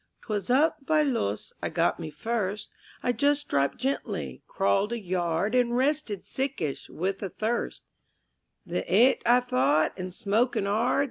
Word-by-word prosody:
_ - - -46
'Twas 205 -2 -3
up 285 +3 +3
by 310 +1 +3
Loos 230 - -2
I - - -1
got 170 +2 +1
me 160 -2 -5
first; 205 +5 -3 0.3
I 245 - +2
just 290 +3 +1
dropped 140 -1 +1
gently, 270 +2 -3
crawled 195 +2 +1
a 235 - -2
yard 180 +1 -1
And 245 -1 +2
rested 265 -7 0
sickish, 265 - -3
with 195 +3 -3
a 195 - -3
thirst 220 +6 -2 0.8
The - - -2
'eat, 255 +3 +5
I 245 +1 +6
thought, 145 - +2
and 185 -1 -5
smoking 215 +3 +1
'ard.... 215 +5 +1
215 Hz, 155 wpm, -27 LUFS, 180-250 Hz, 0.8 s, I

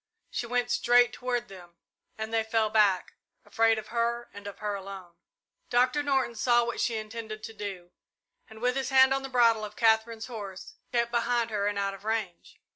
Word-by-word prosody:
She 240 - -3
went 245 0 0
straight 245 0 +4
toward 245 -1 -2
them, 175 -3 -13 0.4
and 220 +1 -5
they 225 -1 +2
fell 220 -1 0
back, 205 -4 +3 0.3
afraid 225 -1 +3
of 215 0 -7
her 235 0 -1
and 200 0 -9
of 200 -1 -8
her 210 -1 -3
alone. 195 -3 -8 0.6
Doctor 250 +4 +3
Norton 270 -4 +1
saw 240 +1 +3
what 235 - -3
she 230 -2 0
intended 215 0 -7
to 225 - -7
do, 195 -4 -7 0.6
and, 220 0 -13
with 250 +1 +1
his 270 -1 -1
hand 265 0 +6
on 270 - -1
the 270 - -6
bridle 230 -3 +4
of 210 0 -7
Katherine's 225 0 +2
horse, 210 - -8 0.2
kept 235 -1 +1
behind 235 -1 0
her 205 -1 0
and 205 0 -1
out 200 0 -1
of 195 - -12
range. 215 -5 -3
225 Hz, 195 wpm, -28 LUFS, 205-240 Hz, 0.6 s, hand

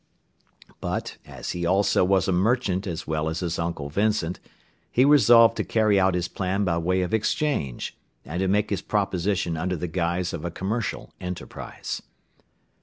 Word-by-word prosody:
But, - - -3
as - - -6
he 85 - -4
also 95 +2 +3
was 95 +1 +2
a - - +2
merchant 100 0 +1
as 85 -2 -4
well 80 0 -1
as 80 +2 -3
his 85 -2 -2
uncle 85 -4 -3
Vincent, 100 -2 0 0.5
he 125 - +4
resolved 120 -6 +7
to - - 0
carry 110 -3 +3
out 95 -1 +3
his 90 -1 -1
plan 95 +2 -1
by 85 -2 +1
way 90 +2 +1
of 90 - -4
exchange, 110 - -1 0.3
and 85 +3 -4
to 95 - +1
make 105 +2 +1
his 100 - 0
proposition 95 -3 0
under 90 +3 -1
the 90 +1 -3
guise 85 +1 -1
of 75 - -5
a 85 - -2
commercial 105 +6 -3
enterprise. 90 -1 -6
95 Hz, 170 wpm, -25 LUFS, 85-105 Hz, 0.5 s, resolved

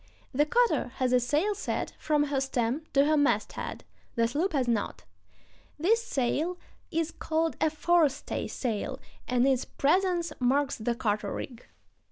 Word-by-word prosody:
The 295 +3 +3
cutter 480 +7 +2
has 255 -2 +1
a 250 - +6
sail 300 - +1
set 410 - -3
from 300 -1 +2
her 280 -2 0
stem 265 +2 -1
to 275 0 +5
her 310 +1 +3
masthead; 240 -8 0 0.3
the 230 -1 +3
sloop 310 +11 0
has 265 -4 +1
not. 225 -4 -1 0.7
This 420 +10 +3
sail 310 - -1 0.3
is 330 0 -1
called 320 0 -1
a 315 - +4
forestay 315 -2 +1
sail, 225 -5 -3 0.3
and 250 +1 +3
its 260 -2 +2
presence 350 +3 +1
marks 270 +3 +2
the 235 +2 -1
cutter 210 -3 -1
rig. 245 -4 -7
285 Hz, 150 wpm, -29 LUFS, 245-325 Hz, 0.7 s, a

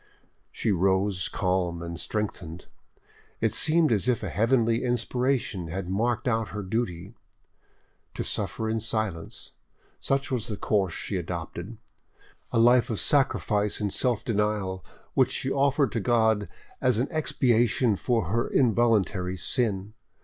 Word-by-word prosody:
She - - -1
rose 95 0 +1
calm 90 -3 -1
and 85 0 -6
strengthened: 90 -5 -4 0.7
it - - +1
seemed 160 -2 +4
as 105 +1 +1
if 125 -3 +1
a - - -3
heavenly 115 0 +2
inspiration 125 -5 -1
had 90 +2 -4
marked 115 +5 0
out 110 -2 +1
her 105 0 -5
duty. 95 -2 -3 1.0
To - - -2
suffer 110 - -3
in 110 0 0
silence, 110 -7 -3 0.5
such 135 +1 -1
was 125 -3 -1
the 105 -4 -4
course 95 -5 0
she 100 - -3
adopted,—a 90 +8 -8
life 120 +1 +5
of 110 - -2
sacrifice 105 -7 +1
and 105 -2 -1
self 125 -5 +1
denial 105 -4 -1 0.3
which 130 -1 +3
she 135 - -2
offered 140 -1 +2
to 115 - -1
God 110 -2 +2 0.3
as 125 -3 +2
an 125 +4 +1
expiation 120 -7 +2
for 115 0 0
her 115 +2 +1
involuntary 110 -7 +2
sin. 105 -1 0
110 Hz, 135 wpm, -26 LUFS, 95-120 Hz, 1.0 s, life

